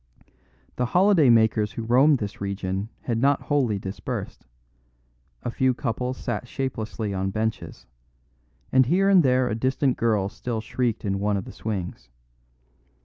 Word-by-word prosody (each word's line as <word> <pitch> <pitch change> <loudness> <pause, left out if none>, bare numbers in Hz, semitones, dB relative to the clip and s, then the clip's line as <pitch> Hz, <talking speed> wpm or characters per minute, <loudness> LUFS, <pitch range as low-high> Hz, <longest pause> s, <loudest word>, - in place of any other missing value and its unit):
The 125 - 0
holiday 185 -7 +5
makers 110 -2 +3
who 115 - -5
roam 130 +6 +5
this 105 -6 -5
region 100 +1 -3
had 115 -2 -2
not 140 +2 +3
wholly 130 -8 0
dispersed; 95 -8 -6 1.0
a 120 - -2
few 130 +1 +1
couples 125 +1 -3
sat 125 - -4
shapelessly 110 -5 -4
on 95 0 -1
benches; 110 +2 -4 0.9
and 130 -2 +4
here 190 +6 +3
and 190 -2 +7
there 130 -3 +2
a 115 - -1
distant 130 +3 0
girl 110 -4 +1
still 115 +3 -4
shrieked 115 0 -2
in 100 -1 -1
one 105 0 0
of 95 - -4
the - - -9
swings. 90 - -5
115 Hz, 145 wpm, -25 LUFS, 105-130 Hz, 1.0 s, and